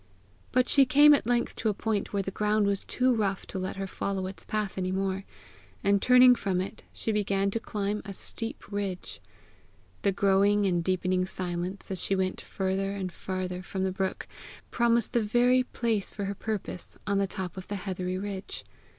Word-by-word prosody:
But 255 0 +3
she 280 - +7
came 290 +3 +8
at 280 - +1
length 240 0 +1
to 225 - 0
a 205 - -1
point 215 -1 -1
where 200 -1 0
the 195 - -4
ground 210 +1 +1
was 200 -1 +1
too 255 0 +2
rough 200 -4 -1
to 190 - -5
let 185 0 -3
her 195 0 -3
follow 195 0 -3
its 190 +1 -6
path 210 -2 -2
any 185 0 -1
more, 195 0 -1 0.6
and 200 0 +3
turning 250 0 +8
from 195 -6 -1
it, 185 - -5
she 225 - -3
began 200 -2 +1
to 230 - -1
climb 210 -2 -2
a 200 - -7
steep 225 +1 -5
ridge. 185 - -4 0.8
The 200 - +2
growing 200 +1 +3
and 175 -3 +1
deepening 185 0 +1
silence 180 +1 -4
as 190 - -2
she 195 - +1
went 185 -1 -1
farther 195 +1 -2
and 190 -2 -4
farther 185 0 -4
from 190 +1 -3
the 190 - +1
brook, 190 0 -3 0.4
promised 235 0 +2
the 240 - +3
very 245 +4 +4
place 230 -4 -1
for 200 - -5
her 200 - -2
purpose 205 -3 -5
on 200 -1 +1
the 200 - +1
top 185 -1 -5
of 185 -1 -8
the 205 - -3
heathery 185 -1 -3
ridge. 195 0 -6
195 Hz, 195 wpm, -28 LUFS, 190-215 Hz, 0.8 s, came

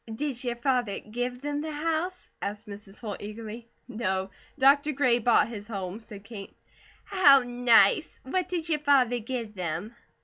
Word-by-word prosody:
"Did 260 +1 -3
your 240 -1 -2
father 245 -4 0
give 245 +3 -4
them 290 0 -2
the 315 0 -4
house?" 325 +4 -2
asked 205 +2 -4
Mrs. 200 -1 -10
Holt 210 -5 -5
eagerly. 220 +2 -8 0.2
"No. 190 -5 -2 0.3
Dr. 285 +2 +4
Gray 255 -3 +3
bought 235 -2 +4
his 210 -3 -8
home," 195 -2 -5
said 210 -3 -12
Kate. 200 -2 -10 0.5
"How 285 -9 +6
nice! 245 - +4
What 365 +7 -2
did 345 -3 -3
your 310 -2 +1
father 265 -5 +3
give 230 -1 -5
them?" 180 +3 -4
240 Hz, 160 wpm, -27 LUFS, 210-285 Hz, 0.5 s, How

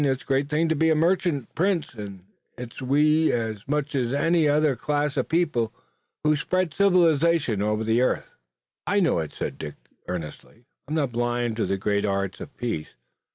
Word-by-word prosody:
It's 135 -2 0
a - - -27
great 135 +1 0
thing 160 +2 +1
to 160 - +1
be 160 +2 +3
a 160 - +4
merchant 165 -5 +1
prince, 180 -4 0
and 100 -4 -8 0.3
it's 125 0 -8
we, 150 +4 +3
as 110 -3 -3
much 145 0 -1
as 125 -4 0
any 160 +2 +2
other 150 -1 +3
class 145 +1 -1
of - - -1
people, 150 -9 +1 0.5
who 155 0 +4
spread 185 +2 -1
civilization 165 - +3
over 105 +1 0
the 115 +2 +2
earth." 130 - +1 0.6
"I 205 - +3
know 175 - +2
it," 80 -2 -4
said - - -5
Dick 75 -2 -6 0.3
earnestly. 90 +7 -7 0.2
"I'm 155 - -3
not 140 -5 0
blind 120 -1 -1
to 115 - 0
the 95 - 0
great 100 +1 0
arts 100 -1 -2
of - - -10
peace. 115 -11 -3
140 Hz, 185 wpm, -25 LUFS, 115-160 Hz, 0.6 s, a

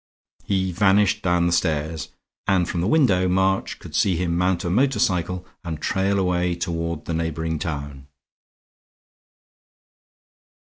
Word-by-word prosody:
He 95 -1 0
vanished 100 +3 +3
down 90 -2 +2
the 85 - +1
stairs; 80 -2 -1 0.4
and 90 -3 +2
from 85 - -2
the 90 - 0
window 105 - +3
March 95 +1 +1
could - - -12
see 95 - +2
him 85 0 -1
mount 90 0 +1
a 85 - -2
motor 135 +7 +2
cycle 90 0 0 0.2
and 80 -3 -5
trail 95 +4 0
away 90 -2 +1
toward 85 -2 -3
the 85 - -3
neighboring 80 0 -2
town. 70 -5 -5
90 Hz, 135 wpm, -23 LUFS, 85-95 Hz, 0.4 s, vanished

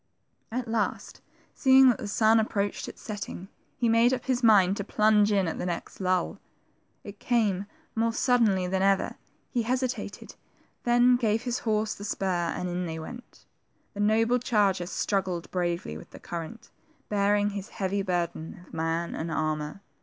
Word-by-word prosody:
At 245 +1 -3
last, 225 -2 -2 0.3
seeing 265 -1 +6
that 240 - +1
the 210 - -5
sun 220 +2 +4
approached 205 -2 -1
its - - -13
setting, 200 -2 -6 0.3
he 240 - +1
made 230 +2 +4
up 250 - -9
his 255 -2 0
mind 200 -5 +5
to 200 - -2
plunge 210 0 +3
in 195 -3 +2
at 160 - -3
the - - -2
next 170 -1 -5
lull. 185 -1 0 0.6
It 200 0 -10
came, 205 -5 +1 0.3
more 230 +1 +1
suddenly 225 -6 +2
than 190 +1 -1
ever; 195 0 +2 0.3
he 245 - +1
hesitated, 250 +2 -3 0.5
then 245 +1 +5
gave 225 -1 0
his 245 -1 -2
horse 215 -1 0
the 205 - -10
spur, 185 -4 -1
and 180 - -3
in 180 0 -2
they 160 0 -4
went. 240 +10 -10 0.5
The 205 - -9
noble 225 +4 +3
charger 200 -7 +1
struggled 185 -3 -2
bravely 175 - -2
with - - -14
the - - -12
current, 175 +7 -7 0.4
bearing 205 0 +2
his 200 0 -6
heavy 195 +1 -2
burden 175 -2 -3
of - - -21
man 165 +1 -1
and 165 +1 -4
armor.. 155 +3 -2
205 Hz, 165 wpm, -27 LUFS, 180-230 Hz, 0.6 s, seeing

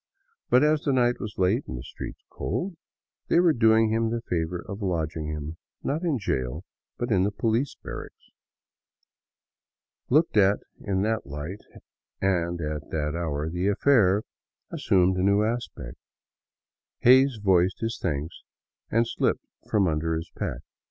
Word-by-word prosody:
But 125 +3 +5
as 150 0 +3
the 140 - 0
night 120 -1 +2
was 110 -2 -6
late 95 +8 +1
and 65 - -5
the - - -7
streets - - -8
cold, 170 - -3 0.5
they - - +4
were 175 -2 +5
doing 110 -2 +4
him 115 0 +1
the 115 0 -3
favor 85 +1 -2
of 100 +1 -6
lodging 80 -4 -2
him, 75 +1 -5 0.3
not 150 +4 -1
in 165 -6 +1
jail, 65 - -2 0.3
but 120 0 -3
in 95 -3 +4
the 100 +2 +1
poHce 115 +5 0
barracks. - - -9 1.8
Looked 150 -2 +3
at 100 0 +5 0.2
in 95 -2 -1
that 110 -6 -1
light, 75 +8 -6 0.6
and 85 -3 0
at 75 -1 -4
that 75 -1 -1
hour, 80 -3 -2
the 90 +4 -1
affair 105 -2 +4 0.5
as - - -5
sumed 95 0 +4
a - - +1
new. 100 +2 +3
aspect. 110 - -4 1.0
Hays 130 +1 +6
voiced 95 -2 +2
his 115 0 -2
thanks 80 -1 -3 0.5
and 115 +1 +3
slipped - - 0 0.2
from 100 -3 +3
under 80 +1 0
his 80 +1 -5
pack. - - -3
100 Hz, 150 wpm, -26 LUFS, 80-115 Hz, 1.8 s, Hays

